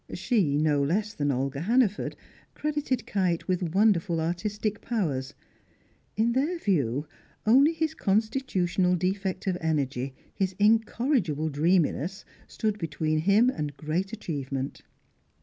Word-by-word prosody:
She, 185 - +1
no 150 -1 +2
less 205 +9 0
than 145 -5 -1
Olga 135 +2 -2
Hannaford, 220 +1 +1 0.4
credited 290 -6 -1
Kite 185 -7 0
with 180 -2 -1
wonderful 190 -5 +3
artistic 205 +6 -2
powers; 155 - -2 0.8
in 225 +2 +3
their 290 +8 0
view, 145 - 0 0.4
only 270 +8 +6
his 320 -1 -1
constitutional 195 - +1
defect 190 +2 -2
of 185 -2 -1
energy, 135 -4 -1 0.2
his 190 -1 -1
incorrigible 220 - +2
dreaminess, 170 +4 +1 0.2
stood 215 -1 -2
between 155 -1 -1
him 205 +9 +4
and 150 - -5
great 165 +7 -2
achievement. 140 - -4
185 Hz, 115 wpm, -27 LUFS, 155-220 Hz, 0.8 s, only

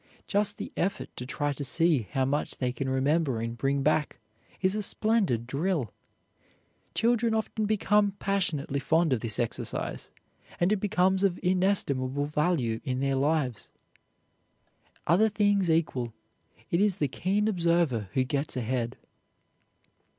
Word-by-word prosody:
Just 205 0 +1
the - - -6
effort 195 +3 -2
to 125 - -6
try 145 +2 -1
to 145 - -5
see 145 - +3
how 135 -1 +1
much 145 +3 -2
they 125 -1 -1
can 130 +1 -4
remember 135 -1 +1
and 115 +1 -4
bring 135 +3 0
back 150 0 +1 0.4
is 185 0 +1
a 215 - -1
splendid 200 - +2
drill. 145 - -1 1.0
Children 230 -1 +2
often 220 -1 -1
become 210 -1 +2
passionately 180 -9 -1
fond 160 +2 +2
of 125 - 0
this 110 -1 -2
exercise, 120 - -3 0.5
and 175 +3 +2
it 215 - +3
becomes 190 -1 +1
of 185 -3 +1
inestimable 145 -8 +1
value 150 -6 0
in 130 -3 -2
their 135 0 0
lives. 135 -4 0 1.4
Other 195 +7 +4
things 205 -3 +2
equal, 130 -8 0 0.6
it 170 - +2
is 205 -3 +2
the 145 - +1
keen 195 - 0
observer 170 - +1
who 130 - +3
gets 140 +1 -1
ahead. 120 0 -2
155 Hz, 140 wpm, -28 LUFS, 130-195 Hz, 1.4 s, Other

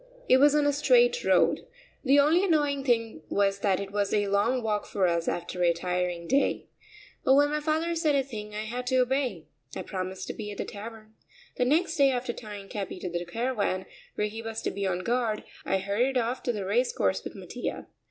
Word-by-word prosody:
It 255 - +6
was 290 +2 +5
on 295 -1 +3
a 290 - +3
straight 485 - +4
road. - - +3 0.4
The 275 0 +4
only 315 +6 +4
annoying 295 -6 +1
thing 230 -7 0
was 200 0 +1
that 195 -2 +1
it 200 -1 -5
was 200 -1 0
a 205 -1 +1
long 230 +5 +1
walk 210 -2 -1
for 195 -2 0
us 170 -1 0
after 175 +1 -3
a 170 -1 +4
tiring 180 0 -2
day. 275 +2 +1 0.6
But 265 - +5
when 290 +1 +4
my 300 - 0
father 315 +3 0
said 315 -3 +1
a 275 - +2
thing 210 -5 -8
I 215 - -3
had 245 +3 -5
to 260 - +1
obey. 265 +1 -1 0.3
I - - -4
promised 185 -1 -5
to - - -2
be 210 -2 -6
at 205 - -8
the - - -3
Tavern. 215 +1 -9 0.4
The 250 - +2
next 320 +5 +1
day, 280 -1 +5
after 245 -2 -2
tying 205 -4 -9
Capi 195 -2 -5
to 180 -1 -5
the 175 0 -2
caravan, 200 -1 -1 0.3
where 210 - 0
he 220 +2 -5
was 225 0 -5
to - - -1
be 200 0 -2
on 185 -1 -2
guard, 235 -1 0 0.2
I 195 - +1
hurried 210 +8 0
off 245 +1 -1
to 245 - +1
the 205 -4 -4
race 235 +6 +1
course 95 -1 0
with - - -8
Mattia. - - -5
225 Hz, 220 wpm, -28 LUFS, 195-270 Hz, 0.6 s, It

